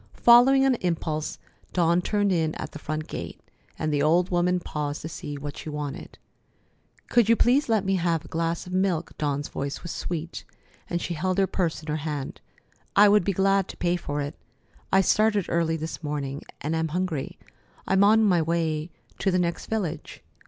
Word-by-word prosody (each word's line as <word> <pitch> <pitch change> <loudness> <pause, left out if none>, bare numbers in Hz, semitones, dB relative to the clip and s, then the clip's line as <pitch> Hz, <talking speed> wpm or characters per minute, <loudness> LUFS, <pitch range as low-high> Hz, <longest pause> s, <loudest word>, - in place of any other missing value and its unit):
Following 260 +3 +6
an 270 - +4
impulse, 160 -3 -2 0.4
Dawn 170 0 +3
turned 205 +1 +1
in 160 -3 0
at - - -6
the - - -9
front 155 0 -4
gate, - - -6 0.4
and 155 -1 -1
the 145 - +1
old 170 +5 +3
woman 180 +1 +2
paused 150 -3 -4
to - - -4
see 145 -2 -6
what 145 0 -6
she - - -7
wanted: 150 -2 -6 0.9
"Could 235 -3 +3
you 230 - +5 0.3
let 220 -4 +1
me 195 0 +2
have 170 -3 0
a - - -10
glass 165 +1 -2
of 180 - -8
milk?" 185 -3 0
Dawn's 145 -1 -1
voice 140 +3 -5
was 170 - -5
sweet, 170 -1 -5 0.5
and 175 - -1
she 175 - -3
held 185 +3 -1
her 195 - +4
purse 170 -4 -2
in - - -12
her 150 0 -1
hand. 145 -3 -5 0.5
"I 205 +1 +7
would 210 -1 +5
be 200 - +1
glad 195 0 +2
to - - -9
pay 175 0 +1
for 145 -4 -3
it. 145 +1 -4 0.6
I 190 - +5
started 210 0 +2
early 165 -1 +1
this 160 +2 -6
morning, 145 -2 -4 0.2
and 155 +3 -1
am 160 0 0
hungry. 165 -3 -3 0.5
I'm 190 +1 +3
on 220 +2 +5
my 180 -5 +4
way 160 -1 -1 0.3
to 195 - +1
the 185 - +2
next 170 -1 -1
village." 175 -8 -4
170 Hz, 190 wpm, -26 LUFS, 155-190 Hz, 0.9 s, I